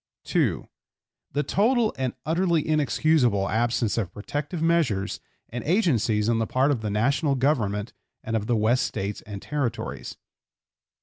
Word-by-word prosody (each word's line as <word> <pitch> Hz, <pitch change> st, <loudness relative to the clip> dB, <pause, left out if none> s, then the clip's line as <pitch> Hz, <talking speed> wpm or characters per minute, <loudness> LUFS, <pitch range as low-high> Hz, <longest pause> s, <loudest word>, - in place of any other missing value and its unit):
(2) -, -, 0 dB, 0.7 s
The 145 Hz, -, +1 dB
total 220 Hz, -, +2 dB
and 130 Hz, -2 st, -2 dB
utterly 170 Hz, 0 st, +1 dB
inexcusable 145 Hz, -8 st, +2 dB
absence 115 Hz, +1 st, +1 dB
of 95 Hz, -6 st, -3 dB
protective 145 Hz, -, -4 dB
measures 155 Hz, -, +1 dB, 0.3 s
and 120 Hz, 0 st, -5 dB
agencies 125 Hz, -, +2 dB
on 115 Hz, -1 st, +2 dB
the 110 Hz, -, 0 dB
part 135 Hz, +3 st, +2 dB
of 125 Hz, -6 st, -1 dB
the 105 Hz, -, -2 dB
National 140 Hz, +8 st, +1 dB
Government 115 Hz, -6 st, 0 dB, 0.3 s
and 115 Hz, -, -2 dB
of 110 Hz, -1 st, -1 dB
the 120 Hz, -, +2 dB
West 115 Hz, +5 st, +2 dB
States 100 Hz, +1 st, -4 dB
and 100 Hz, -2 st, -7 dB
Territories. 145 Hz, -5 st, -3 dB
125 Hz, 140 wpm, -25 LUFS, 110-155 Hz, 0.7 s, total